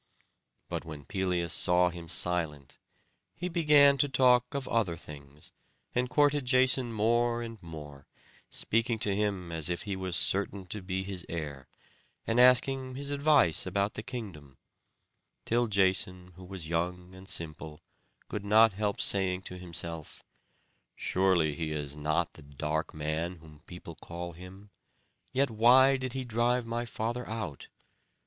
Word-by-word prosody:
But - - -4
when 75 -3 -9
Pelias 90 -1 0
saw 90 -1 +3
him 85 -1 -10
silent, 80 -7 -1 0.6
he 180 - -4
began 150 -5 +5
to 145 - +3
talk 125 0 +3
of 140 -2 -3
other 100 -8 0
things, 75 -1 -11 0.4
and 125 0 0
courted 145 +1 +3
Jason 130 -1 +3
more 120 +2 +1
and 115 -3 -9
more, 75 -4 -10 0.4
speaking 115 +1 0
to 100 -2 0
him 100 -4 -2
as 80 -1 -1
if 85 - -3
he 100 -2 -3
was 95 -2 -3
certain 95 0 +2
to 105 - -5
be 95 0 -3
his 95 -3 -4
heir, 70 -6 -6 0.6
and 115 +2 +1
asking 130 +1 +4
his 140 +1 -5
advice 140 - +3
about 100 +2 0
the - - -5
kingdom; 95 - -8 0.9
till 120 +1 +1
Jason 95 -2 +1
who 95 +2 -12
was 90 -3 -7
young 90 +2 -3
and 95 +1 -12
simple, 80 -1 -3 0.5
could 105 - -5
not 110 +1 +5
help 105 +1 -2
saying 95 -1 +2
to 90 - -7
himself, 85 -3 -6 0.7
"Surely 90 -5 +1
he 80 +1 -4
is 75 -1 -3
not 80 +3 -1
the - - -14
dark 75 +2 -3
man 80 +4 -3
whom 80 -3 -16
people 90 -1 -10
call 85 +2 -7
him. 95 +4 -13 0.6
Yet 135 -1 +1
why 125 +5 +6
did 130 -1 -4
he 130 -1 -4
drive 120 +1 0
my 115 +1 -3
father 120 +1 -4
out?" 110 -11 -5
95 Hz, 150 wpm, -29 LUFS, 85-120 Hz, 0.9 s, why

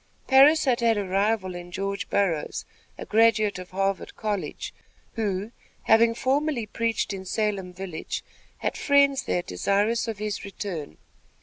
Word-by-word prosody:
Parris 285 +4 +6
had 250 -3 +2
had 230 -2 +3
a 205 - -1
rival 195 0 +1
in 175 0 -8
George 195 +2 -3
Burroughs, 175 -7 0 0.3
a - - -7
graduate 215 -3 +3
of 185 - -9
Harvard 195 +1 -2
College, 205 -8 -3 0.4
who, 205 -1 -2 0.3
having 230 +1 +5
formerly 270 -1 0
preached 225 0 -1
in 190 -1 -6
Salem 195 -2 -1
village, 180 -3 -5 0.3
had - - -2
friends 280 -1 +3
there 175 - 0
desirous 205 - 0
of 225 -3 -3
his 210 -1 -3
return. 185 - -6
205 Hz, 140 wpm, -26 LUFS, 190-230 Hz, 0.4 s, Parris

